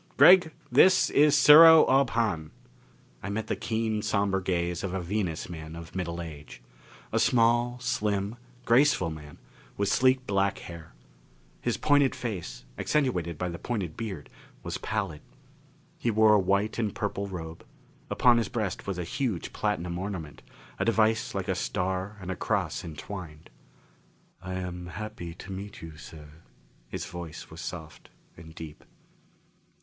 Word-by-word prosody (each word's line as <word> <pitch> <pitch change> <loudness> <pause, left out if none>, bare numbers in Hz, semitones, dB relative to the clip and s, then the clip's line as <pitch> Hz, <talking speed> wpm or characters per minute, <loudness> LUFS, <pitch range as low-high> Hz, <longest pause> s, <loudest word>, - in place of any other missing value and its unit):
Gregg, 180 -3 +8 0.2
this 185 0 +5
is 150 0 +5
Sero 160 +2 +9
Ob 135 -1 +3
Hahn." 105 -10 -1 0.7
I 100 - -5
met 110 +2 -2
the - - -2
keen, 110 -1 -1
somber 100 -2 0
gaze 85 -1 -1
of 95 -1 -3
a - - -1
Venus 90 -2 -2
man 80 -2 -8
of 85 +1 -10
middle 85 -2 -3
age. 75 -6 -10 0.5
A - - +1
small, 120 +1 +3
slim 105 -4 -1 0.3
graceful 120 - +3
man, 75 -2 -10 0.4
with 100 -1 0
sleek 130 0 +3
black 100 -2 +1
hair. 85 -5 -11 0.7
His - - -1
pointed 145 -2 +3
face, 90 - -5
accentuated 90 - 0
by 90 - -2
the 85 - -6
pointed 100 -10 -3
beard, 100 -10 -6 0.3
was - - -4
pallid. 95 -9 -3 0.8
He 120 - 0
wore 110 -1 +5
a 105 - +5
white 100 +4 0
and 110 -3 -1
purple 100 -1 -3
robe; 80 -4 -7 0.5
upon 120 -1 +4
his 115 - -2
breast 105 -6 -3
was 95 -2 -2
a 90 - -2
huge 110 - -3
platinum 90 -4 -2
ornament, 90 -6 -6 0.4
a - - 0
device 110 +1 +2
like - - -3
a - - +1
star 95 +3 -2
and 95 -1 -5
cross - - -1
entwined. 80 0 -8 0.9
"I 95 0 -5
am 90 -1 -5
happy 90 -2 -7
to 95 - -10
meet 100 0 -7
you, 80 -1 -9
sir." 75 0 -13 0.5
His - - -5
voice 85 -3 -8
was - - -9
soft - - -8 0.3
and 80 0 -13
deep. 80 -3 -9
95 Hz, 150 wpm, -28 LUFS, 85-115 Hz, 0.9 s, Sero